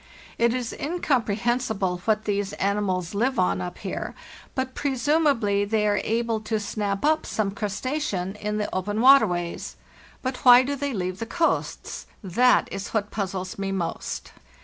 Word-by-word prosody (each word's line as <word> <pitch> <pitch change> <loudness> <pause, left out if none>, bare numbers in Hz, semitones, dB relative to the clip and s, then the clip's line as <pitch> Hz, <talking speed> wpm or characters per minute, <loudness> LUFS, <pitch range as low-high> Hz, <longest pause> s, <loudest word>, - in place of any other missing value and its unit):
It 235 0 +4
is 245 -2 -3
incomprehensible 240 - 0
what 215 -1 +1
these 205 -1 -1
animals 195 -3 -1
live 245 +6 +1
on 185 0 +2
up 180 0 -5
here, - - -5 0.4
but 260 0 -2
presumably 270 -7 +2
they 210 +1 +1
are 205 0 +2
able 230 0 0
to 215 0 -2
snap 205 +1 -2
up 310 +1 +3
some 210 -3 -1
crustacean 210 -2 -2
in 210 0 -2
the 210 - -1
open 205 +3 -1
waterways. 215 -10 +4 0.5
But 255 -1 -2
why 250 -1 +8
do 285 +2 -2
they 280 0 -2
leave 185 -1 -3
the 230 - -4
coasts? 330 +7 -1 0.2
That 240 +7 +4
is 195 +1 -4
what 210 -1 0
puzzles 190 -2 -4
me 195 0 -2
most. 175 -4 -4
215 Hz, 150 wpm, -25 LUFS, 195-250 Hz, 0.5 s, why